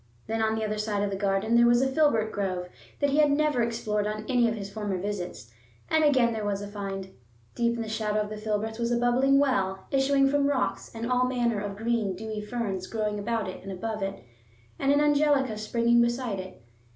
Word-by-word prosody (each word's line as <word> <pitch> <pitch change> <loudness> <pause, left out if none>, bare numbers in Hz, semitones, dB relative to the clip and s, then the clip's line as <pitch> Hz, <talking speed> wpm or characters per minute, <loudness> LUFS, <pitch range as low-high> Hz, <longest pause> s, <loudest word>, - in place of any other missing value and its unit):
Then 225 +1 -2
on 220 0 +1
the 220 0 -1
other 215 0 -2
side 210 -1 -1
of 205 - -1
the - - -2
garden 195 +3 +1
there 235 0 +6
was 240 0 +5
a 265 - +2
filbert 265 -7 +2
grove 185 -3 -3 0.3
that 285 -1 +2
he 285 - +1
had 300 -1 +5
never 290 -3 +2
explored 215 -3 -1
on 215 0 -4
any 245 -3 +3
of 225 - -2
his 200 -2 -5
former 205 -3 -2
visits; 180 - -5 0.4
and 315 0 +4
again 255 -6 +4
there 220 -1 -3
was 205 -1 -1
a 205 - -6
find. 195 -2 -6 0.4
Deep 235 0 +1
in 230 - -3
the - - -7
shadow 215 -1 -1
of 210 0 -4
the 215 - -5
filberts 215 +1 -2
was 235 0 0
a 240 - +2
bubbling 250 +3 +3
well, 195 -9 +1
issuing 275 0 +3
from 280 0 +2
rocks, 280 -3 -1
and 230 +2 -3
all 250 0 +3
manner 240 -4 0
of 200 -1 -5
green, 225 -3 0
dewy 215 +2 -5
ferns 210 -4 -3
growing 210 -2 -2
about 220 0 -1
it 185 - -7
and 195 - -7
above 215 +3 -4
it, 195 0 -4 0.6
and 275 - +2
an 285 +1 +4
angelica 290 -5 +3
springing 235 +2 +2
beside 235 -3 0
it. 185 -10 -9
220 Hz, 225 wpm, -27 LUFS, 205-245 Hz, 0.6 s, there